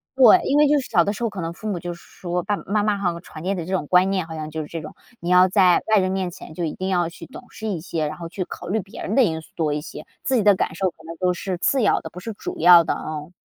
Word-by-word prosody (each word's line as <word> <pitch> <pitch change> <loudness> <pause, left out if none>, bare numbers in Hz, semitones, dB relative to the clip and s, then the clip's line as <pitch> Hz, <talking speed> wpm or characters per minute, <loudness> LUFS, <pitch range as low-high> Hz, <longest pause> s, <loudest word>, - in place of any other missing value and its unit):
对， 255 -5 +7
因 285 - +1
为 300 0 +6
就 295 +1 +4
是 255 - -10
小 170 - +4
的 205 - 0
时 235 - -6
候， 230 - +1
可 205 -2 -8
能 165 -1 -3
父 215 +5 -6
母 190 -4 -2
就 175 +1 -5
说， 175 +1 -5
爸 205 +3 -1
爸 - - -10
妈 205 +1 +1
妈 210 -1 +1
好 185 -3 0
像 170 - -8
传 155 - -11
递 190 +4 -1
的 170 -3 -4
这 185 - -6
种 165 -6 -1
观 185 +1 +4
念， 185 -4 -1
好 160 - -7
像 155 0 -5
就 160 0 -3
是 150 - -7
这 165 +1 -6
种， 155 - -9 0.3
你 170 - -3
要 180 +1 +6
在 185 -2 +4
外 205 - +6
人 185 0 0
面 190 -1 -1
前 165 - -11
就 170 +1 -3
一 155 - -3
定 185 +1 -3
要 175 -2 +1
去 170 - -10
懂 260 - -12
事 220 - -6
一 185 -5 -2
些， 160 -1 -3
然 150 +1 -5
后 170 -1 -6
去 185 +3 -4
考 - - -9
虑 210 +5 0
别 195 +1 -11
人 210 - -2
的 265 - +6
因 160 -6 0
素 - - -17
多 155 -3 0
一 150 - -1
些， 150 - -9 0.2
自 260 - +2
己 225 - +2
的 205 -1 +6
感 160 - -2
受 190 +1 0
可 - - -51
能 165 +1 -7
都 180 0 +2
是 180 +1 -4
次 265 +7 +2
要 210 - +2
的， - - -8
不 180 - -10
是 225 +4 -6
主 - - -7
要 175 0 +8
的， - - -1
嗯。 155 +1 -6
180 Hz, 360 characters per minute, -22 LUFS, 165-200 Hz, 0.3 s, 要